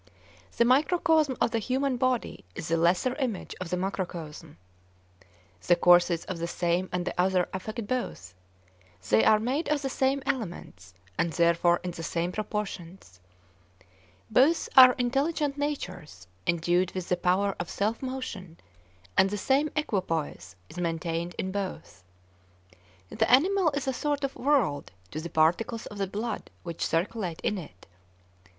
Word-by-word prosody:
The 235 - +4
microcosm 305 +1 +3
of - - +2
the 230 - 0
human 260 +4 0
body 255 -1 -1
is 155 - -5
the 165 - +2
lesser 175 +9 +2
image 250 -9 -3
of 180 - -4
the 180 - -1
macrocosm. 180 - -5 1.1
The 175 - +6
courses 175 -1 +4
of 185 -3 -5
the 170 - -2
same 175 +1 -1
and 180 -1 -2
the - - -2
other 185 -1 +2
affect 215 +4 -5
both; 205 - -4 0.8
they 110 +1 +5
are 215 - +6
made 265 +9 -1
of 295 -1 0
the 270 - -2
same 270 +1 +1
elements 175 - -5 0.2
and 170 - +1
therefore 170 0 +3
in 180 - -3
the 165 - -8
same 170 +2 -2
proportions. 190 - -5 1.1
Both 285 +9 +3
are 255 -1 +10
intelligent 280 +3 0
natures 180 - -5 0.2
endued 175 +2 +1
with 185 -2 -4
the 180 - +3
power 185 +3 +1
of 175 - -4
self 215 +3 -1
motion, 240 -10 -6 0.6
and 190 - +5
the 205 - -3
same 275 +8 +2
equipoise 180 - -2
is - - -13
maintained 170 0 -2
in 190 - -2
both. 185 - -5 1.1
The - - 0
animal 360 +7 +4
is 280 -1 -3
a 265 - +1
sort 290 +2 -2
of 275 - -2
'world' 240 - +1 0.2
to 155 - -4
the 170 - -6
particles 175 +9 +1
of 205 - -9
the 195 - 0
blood 215 +5 -4
which 170 -2 -5
circulate 175 0 -1
in 205 - -1
it. 95 - -12
190 Hz, 150 wpm, -28 LUFS, 170-255 Hz, 1.1 s, are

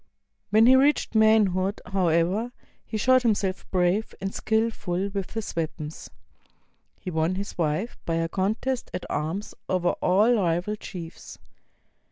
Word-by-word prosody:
When 215 +2 +5
he 255 +2 +7
reached 275 0 +3
manhood, 210 -3 +3
however, 185 +4 +1 0.3
he 220 - -4
showed 255 +4 +4
himself 200 -5 -1
brave 185 +4 +1
and 195 0 -4
skillful 205 -4 -1
with 195 -2 -5
his 225 -1 -4
weapons. 160 -1 -5 0.9
He 180 - -6
won 160 +2 0
his 200 +2 -5
wife 165 +7 -2
by 165 - -1
a 165 0 0
contest 220 +8 -2
at 180 - -5
arms 165 +8 -3 0.2
over 180 -1 +1
all 205 +7 +4
rival 180 -1 0
chiefs. 175 -5 -9
195 Hz, 135 wpm, -26 LUFS, 175-220 Hz, 0.9 s, he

